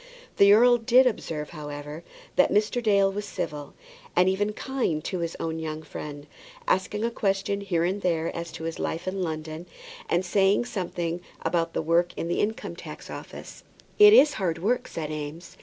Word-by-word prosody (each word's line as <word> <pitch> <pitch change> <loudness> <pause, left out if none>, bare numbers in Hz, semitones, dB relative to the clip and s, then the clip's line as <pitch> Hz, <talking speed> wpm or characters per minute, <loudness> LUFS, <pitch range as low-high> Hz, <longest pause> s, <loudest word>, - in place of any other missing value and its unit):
The 200 0 +7
earl 240 +3 +7
did 250 +3 +5
observe, 160 -10 -2
however, 150 0 -7 0.3
that - - +4
Mr. 215 +4 +1
Dale 200 -3 +3
was 205 +1 -4
civil, 150 -7 -5 0.4
and 180 +1 +4
even 205 +3 +1
kind, 215 - -2
to 185 - -3
his 170 -1 -3
own 160 0 -3
young 155 0 -5
friend, 145 -2 -8 0.4
asking 210 +3 0
a 235 - -1
question 200 -1 -1
here 175 -4 0
and 190 +4 -1
there 165 -3 0
as 170 0 -5
to - - -7
his 165 0 -4
life 165 +3 -3
in 190 +1 -2
London, 160 0 -4 0.4
and 175 +2 +1
saying 195 +4 +3
something 175 -5 -3 0.2
about 165 -1 0
the - - -1
work 170 +2 +1
at - - -3
the 175 - -1
Income 220 +2 -2
tax - - -9
Office. - - -9 0.4
"It 420 0 +10
is 305 - +7
hard 170 -3 0
work," 220 +9 0
said 155 -2 -5
Eames. 155 +3 -7
175 Hz, 180 wpm, -26 LUFS, 160-205 Hz, 0.4 s, It